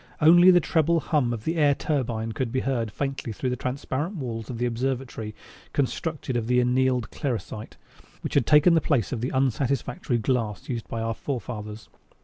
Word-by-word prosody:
Only 175 +4 +7
the 180 -1 +7
treble 165 0 +2
hum 145 -6 +1
of 115 -3 -4
the 165 +6 -1
air 145 -2 +4
turbine 115 -8 -2
could 115 +1 -2
be 130 +1 0
heard 120 -5 -1
faintly 135 0 -3
through 125 +5 -2
the - - 0
transparent 135 - -3
walls 115 - -5
of 125 - -4
the 120 - 0
observatory 120 -3 -3 0.4
constructed 145 0 -2
of 115 -2 -1
the 125 0 +3
annealed 125 -1 +1
clersite, 115 -5 -4 0.4
which - - -4
has - - +4
taken 150 +5 +6
the 165 - +4
place 130 -9 +1
of 120 -4 -3
the 125 - -1
unsatisfactory 130 -1 0
glass 115 -2 -1
used 120 -3 -3
by 115 - -4
our 115 0 -1
forefathers. 110 -6 -5
125 Hz, 180 wpm, -26 LUFS, 115-140 Hz, 0.4 s, Only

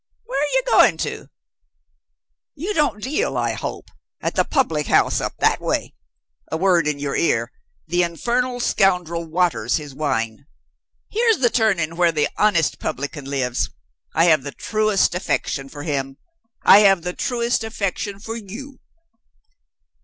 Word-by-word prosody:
Where 460 - -2
are 295 - -1
you - - +3
going - - +5
to? - - -4 1.3
You 350 +8 -3
don't 285 - 0
deal, 305 - -1
I - - 0
hope, - - -6 0.3
at - - -2
the - - +2
public 165 - 0
house - - +3
up - - -3
that - - +2
way? - - -2 0.6
A 160 - 0
word 175 -3 +3
in 150 -1 0
your 140 -1 -3
ear 410 +7 +1 0.4
the 175 +2 +1
infernal 245 +9 -1
scoundrel 180 -7 +1
waters 160 -8 +1
his 145 -3 -8
wine. 135 -3 -2 0.6
Here's 455 0 +3
the 240 -3 +2
turning 175 -8 +1
where 175 -1 +4
the 150 -2 +1
honest 190 -7 +2
publican 145 +1 -4
lives. 130 -3 -1 0.5
I 165 - +4
have 155 -4 +5
the 140 +1 -6
truest 215 -4 +1
affection 135 -5 -2
for 145 +1 -8
him. 135 -3 -3 0.5
I 200 - +8
have 195 -4 +4
the 180 - -3
truest 235 -1 -1
affection 200 -2 -3
for 225 +2 -6
you. 235 +6 -9
180 Hz, 150 wpm, -21 LUFS, 150-235 Hz, 1.3 s, I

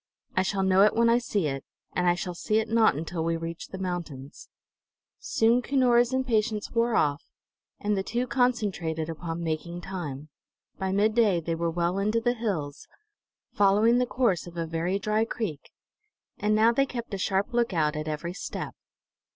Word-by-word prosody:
I 185 - +3
shall 195 +1 0
know 190 0 +4
it 210 - +5
when 230 0 +4
I 235 - +4
see 210 -6 -1
it, 135 -2 -2 0.3
and 180 0 +1
I 175 - +3
shall 180 0 -4
see 215 +5 0
it 220 0 +1
not 225 -6 +4
until 165 +2 -3
we 165 0 0
reach 165 0 -6
the 190 - -8
mountains." 170 -7 -6 0.7
Soon 230 +2 +2
Cunora's 245 -2 +3
impatience 225 -5 0
wore 235 0 +1
off, 145 +1 +1 0.6
and 210 0 0
the 190 - 0
two 235 +5 -2
concentrated 205 - 0
upon 165 +1 -5
making 170 +2 -3
time. 155 -6 -6 0.5
By 190 -1 -1
midday 210 -1 +3
they 165 0 -3
were 170 +1 -1
well 170 +3 0
into 215 +3 +1
the 240 +1 +1
hills, 190 -12 -4 0.7
following 210 +4 +4
the 250 - +1
course 230 -10 +1
of 175 0 -10
a 165 - -1
very 165 +4 -1
dry 215 +2 +1
creek; 205 -10 -4 0.7
and 210 0 +2
now 220 +2 +5
they 275 +3 +2
kept 235 -4 -6
a 195 - -2
sharp 195 +5 0
lookout 175 -11 +1
at 155 0 -4
every 155 +3 -3
step. - - -5
195 Hz, 175 wpm, -27 LUFS, 165-230 Hz, 0.7 s, it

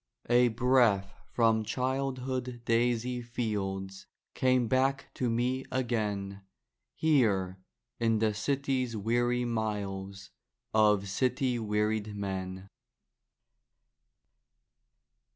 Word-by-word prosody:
_ 120 - +3
_A 115 - -4
breath 120 -6 +3 0.2
from 115 -2 +3
childhood 130 0 -2
daisy 120 +1 +1
fields 100 -5 -4 0.3
Came 130 -2 +2
back 135 +2 +1
to 125 - -1
me 125 +3 0
again, 105 -6 -2 0.5
Here 100 -12 +2 0.4
in 115 -1 +2
the 110 0 +1
city's 130 0 -1
weary 120 +3 +1
miles 100 -4 -3 0.4
Of 105 -2 +4
city 125 +3 0
wearied 105 0 -1
men. 95 -1 -4
115 Hz, 85 wpm, -30 LUFS, 100-125 Hz, 0.5 s, Of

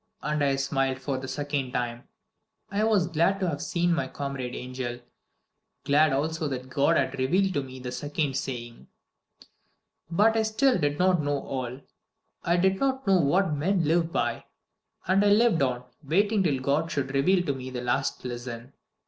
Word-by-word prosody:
And 150 -1 0
I 140 -1 +2
smiled 135 -1 0
for 135 0 -3
the 130 - -7
second 140 -1 -3
time. 120 -1 -3 0.6
I 205 +1 0
was 215 -5 +3
glad 170 +4 +1
to 185 - 0
have 145 -4 -2
seen 175 0 +1
my 170 - -1
comrade 135 -3 -5
angel 125 -1 -5 0.8
glad 150 +2 +4
also 155 +3 -1
that 130 -1 -5
God 145 +5 +3
had - - -1
revealed 185 +9 +2
to 145 - 0
me 130 -1 -9
the 125 -1 -6
second 145 0 -2
saying. 120 -4 -5 1.2
"But 210 +6 +3
I 225 - +3
still 220 +4 +2
did 145 0 0
not 180 -1 +3
know 145 -1 -1
all. 130 0 -5 0.6
I 170 +1 +2
did 190 +2 +2
not 265 -1 0
know 195 -2 +4
What 170 +3 +2
men 175 +5 +1
live 165 +2 +1
by. - - -1 0.6
And 190 +2 +3
I 205 - +4
lived 210 -5 +4
on, 125 -2 0 0.2
waiting 200 +8 +2
till 150 -8 +1
God 145 +5 0
should 135 -1 -2
reveal 180 +7 +3
to 140 - 0
me 130 -1 -7
the 125 -1 -5
last 125 +2 -1
lesson. 120 +1 -6
145 Hz, 175 wpm, -27 LUFS, 130-180 Hz, 1.2 s, glad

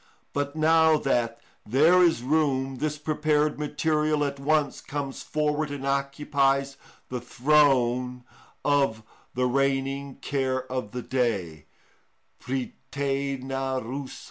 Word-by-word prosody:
But 145 +1 -2
now 160 0 +5
that 120 -5 0 0.2
there 155 +10 +5
is 165 -8 +3
room, 135 -2 +1
this 150 +2 -2
prepared 150 0 0
material 150 0 +1
at 140 -1 -4
once 145 0 +1
comes 140 -2 -5
forward 150 0 -1
and 140 -1 -5
occupies 140 0 +1 0.3
the 125 -1 -4
throne 125 -2 +2 0.4
of 135 -7 +2 0.3
the 125 0 +1
reigning 135 +1 0
care 130 -2 -1
of 130 -5 -3
the 125 +2 -6
day 95 - -2 0.8
(πρυτανευουσα). 135 0 -3
140 Hz, 105 wpm, -26 LUFS, 130-150 Hz, 0.8 s, now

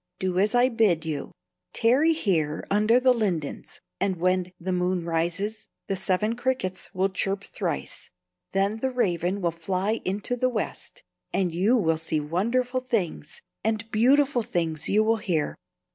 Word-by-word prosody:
Do 185 -1 -1
as 210 +5 +2
I 245 +1 +5
bid 210 -9 +2
you; 150 -3 -4 0.4
tarry 275 +8 +4
here 160 - 0
under 215 +4 +4
the 255 0 +5
lindens, 185 -11 -3 0.2
and 195 0 +1
when 185 +1 0
the 185 +2 -2
moon 180 -1 0
rises, 170 +6 -2 0.2
the 195 - -1
Seven 190 +4 0
Crickets 245 -7 -2
will 190 +1 +1
chirp 195 +1 -2
thrice; - - -4 0.4
then 200 +3 +1
the 265 +4 -1
Raven 185 -6 0
will 170 -2 +1
fly 185 +6 -1
into 200 +6 -2
the 255 +1 +1
west, 255 - -5 0.3
and 180 -3 0
you 200 +9 +3
will 165 -7 +2
see 160 -1 -1
wonderful 235 - 0
things, 205 - -3 0.2
and 220 0 -1
beautiful 265 +3 +4
things 165 -6 -2
you 215 +2 +4
will 225 +1 +2
hear." 170 -8 -1
195 Hz, 155 wpm, -26 LUFS, 175-230 Hz, 0.4 s, I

